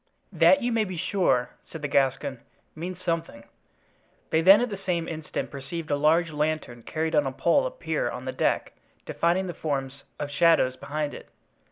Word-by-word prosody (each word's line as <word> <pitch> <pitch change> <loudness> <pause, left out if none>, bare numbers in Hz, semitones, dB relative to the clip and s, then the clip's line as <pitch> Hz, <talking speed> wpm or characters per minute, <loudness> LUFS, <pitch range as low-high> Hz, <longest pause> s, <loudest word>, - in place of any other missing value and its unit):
"That, 280 -2 +5
you 245 - 0
may 225 -1 +2
be 185 -4 -5
sure," 165 -9 +1 0.2
said 160 -2 -9
the - - 0
Gascon, 135 -1 +1 0.4
"means 175 +3 -6
something." 165 -9 -2 0.9
They 160 - +3
then 195 +4 +8
at 245 -1 -1
the 200 - -5
same 175 -4 -1
instant 160 -1 -5
perceived 155 +3 -6
a - - +3
large 160 +3 +3
lantern 150 -5 -2
carried 160 +6 -3
on 145 -2 +3
a - - -2
pole 170 - +2
appear - - -2
on - - -7
the - - -2
deck, - - 0 0.3
defining 175 +3 +1
the 175 - -4
forms 135 -3 -3 0.2
of 145 -1 -4
shadows 145 -4 +4
behind 145 +2 -4
it. - - -11
160 Hz, 180 wpm, -26 LUFS, 145-180 Hz, 0.9 s, then